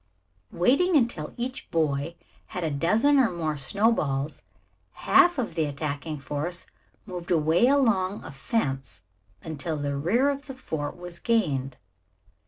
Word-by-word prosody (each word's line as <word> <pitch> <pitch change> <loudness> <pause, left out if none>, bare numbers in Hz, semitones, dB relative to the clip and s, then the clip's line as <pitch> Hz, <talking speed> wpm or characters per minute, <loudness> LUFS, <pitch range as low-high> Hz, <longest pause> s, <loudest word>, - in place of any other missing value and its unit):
Waiting 280 - +3
until 230 - 0
each 255 +2 -4
boy 155 -1 0 0.3
had 180 - -5
a 160 - 0
dozen 215 - +3
or 250 - +4
more 160 -3 -2
snowballs, 150 -3 +1 0.5
half 355 -2 +4
of 245 -9 -2
the 160 -1 +1
attacking 145 +1 -4
force 150 +5 -4 0.4
moved 180 -4 -7
away 165 +6 +3
along 220 -9 +2
a - - -8
fence 135 - -2 0.4
until 160 0 -3
the 145 -1 -2
rear 225 - +2
of 280 +1 -6
the 270 - -7
fort 160 - -4
was 175 -1 -9
gained. 140 - 0
170 Hz, 135 wpm, -26 LUFS, 145-230 Hz, 0.5 s, or